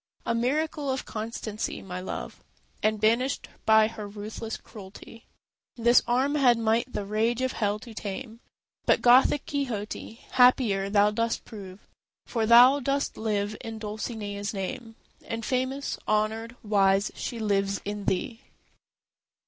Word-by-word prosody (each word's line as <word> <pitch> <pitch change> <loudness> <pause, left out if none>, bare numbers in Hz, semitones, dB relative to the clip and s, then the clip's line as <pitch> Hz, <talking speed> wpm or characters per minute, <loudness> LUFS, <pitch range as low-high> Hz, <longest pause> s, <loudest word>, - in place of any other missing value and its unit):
A 235 - 0
miracle 285 +5 -1
of 265 0 -2
constancy 215 -1 -4
my 180 -1 -6
love; 185 - -6 0.4
And 215 0 +1
banished 235 +5 +1 0.2
by 220 0 +6
her 220 -2 -7
ruthless 215 +2 -6
cruelty, 210 +2 -13 0.5
This 240 +1 +5
arm 260 +4 +2
had 255 -5 +4
might 230 +2 +1
the 200 - -3
rage 220 +4 0
of 260 0 0
Hell 205 -1 -1
to 225 +2 -11
tame. 220 +3 -6 0.5
But, - - +3
Gothic 255 +3 +5
Quixote, 240 -8 -4 0.2
happier 240 -6 +4
thou 205 0 +4
dost 230 +1 -1
prove, 195 -3 -10 0.4
For 225 -3 -1
thou 245 +4 +8
dost 280 +1 -1
live 210 -1 -1
in 225 -1 -6
Dulcinea's 210 -1 -5
name, 225 +4 -5 0.3
And 230 -1 -4
famous, 260 +2 -2
honoured, 220 +2 0
wise, 200 -1 +3
she 240 - -5
lives 200 -2 0
in 205 0 -4
thee. 225 +6 -2
220 Hz, 135 wpm, -27 LUFS, 205-245 Hz, 0.5 s, thou